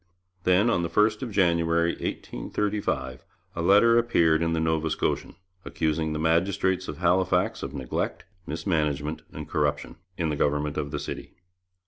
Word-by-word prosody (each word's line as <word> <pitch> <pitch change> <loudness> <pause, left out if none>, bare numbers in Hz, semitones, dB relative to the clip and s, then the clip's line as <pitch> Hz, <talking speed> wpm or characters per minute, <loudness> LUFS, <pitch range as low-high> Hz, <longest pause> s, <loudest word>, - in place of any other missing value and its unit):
Then, 90 +5 +4
on 90 - +1
the 85 - -2
1st 105 +5 +2
of 130 - -3
January 85 -4 +2
1835, 65 - -3 0.3
a 85 - -2
letter 105 +6 +5
appeared 85 -9 +3
in 85 0 +1
the 80 - 0
Nova 80 0 0
Scotian, 80 - -2 0.3
accusing 80 0 -1
the 75 - -2
magistrates 90 +3 +1
of 75 - -6
Halifax 90 +1 +1
of - - -6
neglect, 65 -3 -3 0.2
mismanagement, 75 -3 -1
and - - -7
corruption, 75 -1 -1 0.2
in 80 -2 0
the 75 - -1
government 75 +1 0
of 70 - -2
the 75 - -3
city. - - -7
80 Hz, 150 wpm, -26 LUFS, 75-95 Hz, 0.3 s, letter